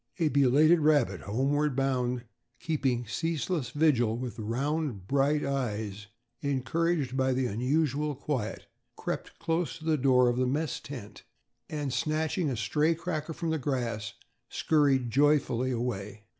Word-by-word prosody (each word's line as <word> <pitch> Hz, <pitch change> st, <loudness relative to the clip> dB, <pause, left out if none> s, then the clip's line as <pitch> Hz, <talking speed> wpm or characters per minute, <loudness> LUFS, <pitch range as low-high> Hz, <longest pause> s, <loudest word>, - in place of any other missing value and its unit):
A 165 Hz, -4 st, +2 dB
belated 145 Hz, +5 st, +5 dB
rabbit 145 Hz, -, +2 dB
homeward 135 Hz, +7 st, 0 dB
bound, 125 Hz, -2 st, 0 dB, 0.4 s
keeping 135 Hz, -6 st, 0 dB
ceaseless 165 Hz, -, -2 dB
vigil 125 Hz, -7 st, +2 dB
with 120 Hz, -4 st, -5 dB
round 125 Hz, -, -2 dB
bright 140 Hz, +5 st, +2 dB
eyes, 110 Hz, -7 st, -3 dB, 0.3 s
encouraged 140 Hz, +1 st, 0 dB
by 130 Hz, 0 st, +2 dB
the 130 Hz, 0 st, 0 dB
unusual 145 Hz, +5 st, 0 dB
quiet, 130 Hz, -5 st, -3 dB, 0.3 s
crept -, -, -5 dB
close 165 Hz, 0 st, -1 dB
to 160 Hz, -, -12 dB
the 160 Hz, -1 st, +2 dB
door 125 Hz, -1 st, +4 dB
of 120 Hz, 0 st, +1 dB
the 130 Hz, 0 st, +2 dB
mess 145 Hz, +2 st, -1 dB
tent, 125 Hz, -7 st, -9 dB, 0.5 s
and 145 Hz, -4 st, -3 dB
snatching 155 Hz, +3 st, 0 dB
a 125 Hz, -, -2 dB
stray 150 Hz, +8 st, +1 dB
cracker 165 Hz, -2 st, -4 dB
from 165 Hz, +1 st, -2 dB
the 160 Hz, -, 0 dB
grass, 120 Hz, -6 st, -2 dB, 0.4 s
scurried 140 Hz, -6 st, +2 dB
joyfully 135 Hz, -2 st, +3 dB
away. 110 Hz, -4 st, -3 dB
135 Hz, 135 wpm, -29 LUFS, 120-155 Hz, 0.5 s, belated